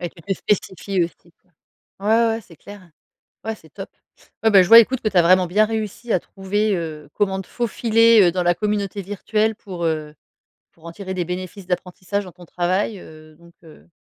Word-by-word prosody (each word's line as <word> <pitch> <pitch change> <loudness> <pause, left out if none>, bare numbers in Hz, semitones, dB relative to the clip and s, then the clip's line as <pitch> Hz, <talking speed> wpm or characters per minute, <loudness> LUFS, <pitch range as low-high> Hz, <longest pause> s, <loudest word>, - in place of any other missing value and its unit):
Et 175 - -3
qui 170 - -21
était 195 +4 -3
spécifié 190 -2 -1
aussi, 170 0 -12
quoi. 185 - -38 0.5
Ouais 200 - -3
ouais 230 +1 +4
ouais, 225 0 -1
c'est 180 -6 -18
clair. 195 +1 -13 0.5
Ouais, 220 0 -3
c'est 160 - -20
top. 195 +6 -9 0.5
Ouais, 220 - +5
ben 195 -2 +8
je - - -2
vois 230 +4 +10
écoute 250 +3 +2
que - - -1
tu 195 - -1
as - - +8
vraiment 185 +2 +4
bien 210 +5 +3
réussi 220 +1 -4
à - - +3
trouver, 205 +3 -2
heu, 155 -3 -6
comment 195 -2 0
te 190 - -15
faufiler, 230 -1 +3
heu, - - -2
dans 180 +1 -1
la 175 0 +2
communauté 205 -1 -2
virtuelle 210 +3 -1
pour, 185 -4 -8
heu, 155 -2 -2 0.6
pour 165 - -25
en 170 - -7
tirer 190 +1 -6
des 180 -1 -2
bénéfices 185 +2 -6
d'apprentissage 185 +2 -3
dans 180 - -11
ton 180 +1 -15
travail, 185 +5 -1
heu, 155 -1 -15
donc 170 +1 -19
heu. 160 +1 -17
190 Hz, 215 wpm, -21 LUFS, 175-210 Hz, 0.6 s, vois